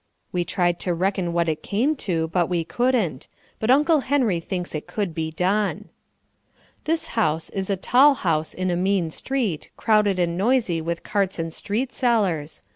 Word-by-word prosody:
We 175 -1 0
tried 175 -1 0
to 175 -2 -1
reckon 185 0 0
what 170 0 +1
it 155 -1 -1
came 250 +10 0
to, 165 -8 -1
but 175 0 +1
we 175 -2 0
couldn't; 220 - 0 0.3
but 220 - -2
Uncle 300 +4 +5
Henry 255 -10 +1
thinks 180 +1 -4
it 150 - -5
could 200 -6 -3
be 160 0 -2
done. 190 +6 -1 1.0
This 325 +1 -1
house 160 -8 0
is 195 0 -3
a 195 - +1
tall 270 +9 +5
house 160 -8 -1
in 185 0 -1
a - - +1
mean 185 -2 +1
street, 230 - -2
crowded 210 -3 +3
and 170 -1 0
noisy 200 -4 +1
with 170 +1 -3
carts 195 -2 0
and 165 -1 -3
street 230 +9 -2
sellers. 185 - 0
185 Hz, 175 wpm, -23 LUFS, 170-225 Hz, 1.0 s, Uncle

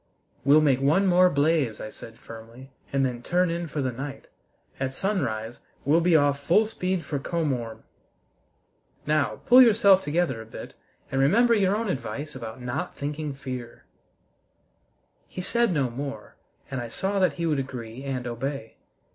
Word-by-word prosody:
"We'll 145 +3 +6
make 135 -3 +3
one 155 +8 +3
more 180 0 +5
blaze," 145 -6 +1
I 110 - -6
said 115 0 -12
firmly, 115 +4 -12 0.2
"and 135 -1 +2
then 125 -2 -3
turn 175 +5 +1
in 170 0 -3
for 150 -2 -3
the 130 - 0
night. 135 +3 -7 0.5
At 130 0 -2
sunrise 120 - -2 0.3
we'll 155 +5 +4
be 170 0 +4
off 145 -2 +3
full 175 +10 +3
speed 185 -4 -2
for 145 - -3
Komorn. 130 -8 -2 1.2
Now, 145 -8 0
pull 250 +2 +8
yourself 205 -5 +6
together 150 -7 -1
a - - -10
bit, - - -9 0.4
and 135 - +1
remember 230 - +4
your 200 -2 +3
own 225 +1 -2
advice 150 -2 -4
about 115 -2 -7
not 125 +8 -4
thinking 145 0 -4
fear!" 130 -3 -7 1.4
He 180 - -6
said 235 +3 +1
no 140 -7 0
more, 135 -3 -6 0.4
and 130 -2 -2
I 120 - -5
saw 195 - -2
that 185 - +3
he 170 - -3
would 150 -4 +1
agree 125 -2 -6
and 130 -3 -3
obey. 120 0 -5
140 Hz, 165 wpm, -26 LUFS, 125-175 Hz, 1.4 s, pull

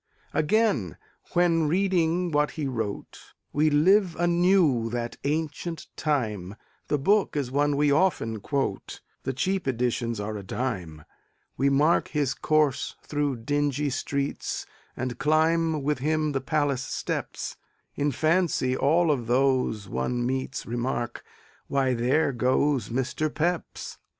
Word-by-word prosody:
Again, 155 - +1 0.4
when 170 -3 +3
reading 175 0 +1
what 150 0 +2
he 155 - -1
wrote, 115 -6 -4 0.3
We 155 +1 +3
live 180 +4 +4
anew 175 -8 +3
that 120 0 -4
ancient 160 +3 -2
time 105 - -1 0.3
(The 150 - +1
book 200 +8 +2
is 135 -4 -2
one 145 +1 +2
we 145 0 +3
often 140 - +1
quote 135 -3 -3 0.2
The - - 0
cheap 185 +6 -1
editions 120 -2 -1
are 105 +1 -3
a - - -6
dime); 90 - -4 0.5
We 140 +2 +2
mark 150 +5 +3
his 145 -4 0
course 155 -3 +1
through 145 -5 -2
dingy 145 +1 0
streets 140 +2 -2 0.3
And 125 -1 -3
climb 160 +1 +2
with 150 -1 0
him 155 +2 0
the 135 -2 -1
palace 145 -2 0
steps; - - -4 0.4
In 145 0 0
fancy 155 -2 +1
all 160 +5 +3
of 125 -6 -1
those 125 -5 +1
one 120 - -1
meets 130 +2 -2
Remark: 120 0 -3 0.4
"Why, 135 -2 +1
there 130 +6 +2
goes 130 0 +1
Mr. 130 +5 -1
Pepys!" 170 +3 -3
140 Hz, 130 wpm, -26 LUFS, 125-155 Hz, 0.5 s, live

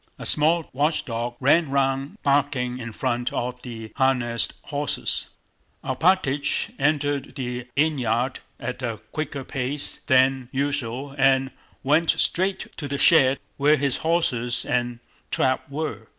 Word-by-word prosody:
A - - -8
small 160 +2 +3
watchdog 125 -5 -1
ran 145 +4 +4
round 135 +5 0
barking 135 -3 +1
in 120 -1 -6
front 120 +1 -1
of 125 +1 -3
the 110 -3 -8
harnessed 125 -4 +1
horses. 145 0 -2 0.5
Alpátych 140 -1 +1
entered 145 -1 0
the 125 -2 -4
innyard 130 -4 +1 0.2
at 125 +1 -5
a 115 -4 -3
quicker 145 -3 -4
pace 135 +2 -2
than 130 -1 +3
usual 140 -1 -2
and 135 0 +3 0.3
went 155 +4 +3
straight 190 +2 +1
to 145 - -4
the 140 0 -2
shed 135 -4 +5 0.2
where 150 +2 +4
his 140 -1 0
horses 125 -8 0
and 120 -1 -1 0.3
trap 130 0 0
were. 140 -7 -4
135 Hz, 125 wpm, -24 LUFS, 125-145 Hz, 0.5 s, shed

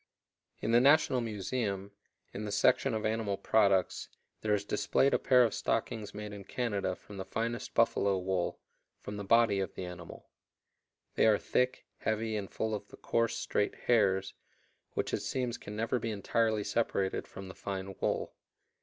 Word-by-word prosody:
In 110 - 0
the 120 +1 +6
National 140 -2 +5
Museum, 100 -2 -3 0.4
in 105 - -5
the 105 - -4
section 100 +2 +3
of 110 - -2
animal 110 -2 0
products, 100 -4 +2 0.3
there 105 -1 +2
is 100 0 -3
displayed 135 +6 +2
a - - +3
pair 125 -2 +5
of 115 - +1
stockings 110 -3 -2
made 105 0 -6
in 100 -1 -8
Canada 100 -4 -2
from 100 - -12
the 95 - -3
finest 115 +4 -3
buffalo 100 -4 +3
wool, 95 -1 -1 0.4
from 105 - -7
the 100 - -4
body 115 -1 +4
of 95 - -3
the 95 - -4
animal. 90 -1 -9 0.9
They - - +4
are 105 -2 +5
thick, 125 +4 0
heavy, 110 0 -1
and 100 -2 -3
full 110 0 -2
of 105 - -4
the - - -14
coarse, 115 0 0
straight 105 - 0
hairs, 95 -5 +2 0.6
which - - -2
it - - 0
seems 125 -3 -2
can 105 - -8
never 115 +3 0
be 115 - -3
entirely 110 +1 +1
separated 100 -4 -1
from 95 0 -9
the 95 - -8
fine 95 -1 -5
wool. - - -1
105 Hz, 170 wpm, -31 LUFS, 100-115 Hz, 0.9 s, the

